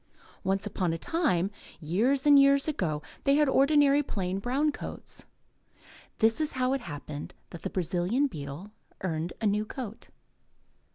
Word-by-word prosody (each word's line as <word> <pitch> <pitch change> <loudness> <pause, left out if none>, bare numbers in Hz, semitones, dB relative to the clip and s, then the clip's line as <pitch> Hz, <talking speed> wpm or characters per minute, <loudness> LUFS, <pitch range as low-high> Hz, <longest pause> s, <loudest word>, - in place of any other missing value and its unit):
Once 195 +2 0
upon 185 -4 -1
a - - -2
time, 195 - 0 0.3
years 225 - +1
and 290 -1 +8
years 275 +1 +5
ago, 160 - -1 0.2
they 275 0 +4
had 300 0 +4
ordinary 285 +1 +4
plain, 190 -8 -3
brown 270 +8 +1
coats. - - -8 0.9
This 225 +6 +2
is 305 - -1
how 255 0 +1
it 270 - -1
happened 145 -4 -7 0.2
that 170 - -9
the - - -3
Brazilian 185 - 0
beetle 150 - -6 0.3
earned 170 -2 -2
a - - -1
new 210 +1 +2
coat. 225 0 -8
215 Hz, 150 wpm, -28 LUFS, 175-275 Hz, 0.9 s, and